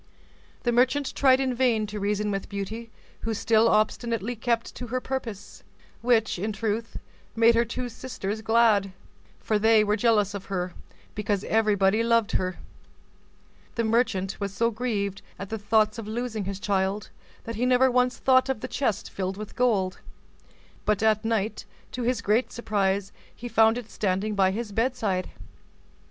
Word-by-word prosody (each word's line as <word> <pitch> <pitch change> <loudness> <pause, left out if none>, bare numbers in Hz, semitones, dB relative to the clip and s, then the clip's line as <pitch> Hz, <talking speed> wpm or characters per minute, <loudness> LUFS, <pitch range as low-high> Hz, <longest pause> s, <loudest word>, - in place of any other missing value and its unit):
The 240 - +2
merchant 260 +4 +2
in 260 -1 +4
vain 240 -3 +2
tried - - -9
to 210 - -4
reason 205 +1 0
with 195 -1 -4
Beauty 210 +4 -5 0.3
who 225 0 -3
still 225 +1 +3
obstinately 230 +1 0
kept 230 +1 -1
to 245 - -7
her 255 +2 -1
purpose; 235 -6 -6 0.4
which, 225 -6 +2
in 210 +4 -2
truth, 220 +2 -3 0.4
made 230 +1 +5
her 235 0 +3
two 245 +2 -4
sisters 225 -4 -5
glad, 220 -4 +3 0.4
for 215 -1 0
they 220 0 +5
were 210 0 +1
jealous 210 -2 +2
of 200 -1 -6
her, 180 -2 -3 0.4
because 205 -1 -1
everybody 210 -1 +2
loved 230 -1 +2
her. 185 -1 -1 1.2
The 230 - 0
merchant 220 -4 0
was 200 -1 -3
so 230 +4 +1
grieved 210 -4 -2 0.2
at 195 - -7
the 220 - -4
thoughts 215 +1 +2
of 215 - -7
losing 220 -2 -3
his 195 0 -4
child, 195 0 -1 0.3
that 230 - -5
he 250 +2 +1
never 255 +1 +4
once 250 0 +2
thought 260 0 +3
of 265 -5 -1
the 255 - -4
chest 255 -7 -1
filled 190 0 -3
with 215 0 -8
gold, 205 -7 +1 0.8
but 210 0 +1
at 215 0 +3
night, 220 -1 -1 0.3
to 250 - -5
his 240 -1 0
great 220 +4 +1
surprise, 200 -3 -1 0.2
he 240 - -7
found 225 0 +4
it 230 -3 -8
standing 200 +1 -1
by 195 -2 +3
his 215 +2 -4
bedside. 220 -5 -1
220 Hz, 165 wpm, -26 LUFS, 200-235 Hz, 1.2 s, made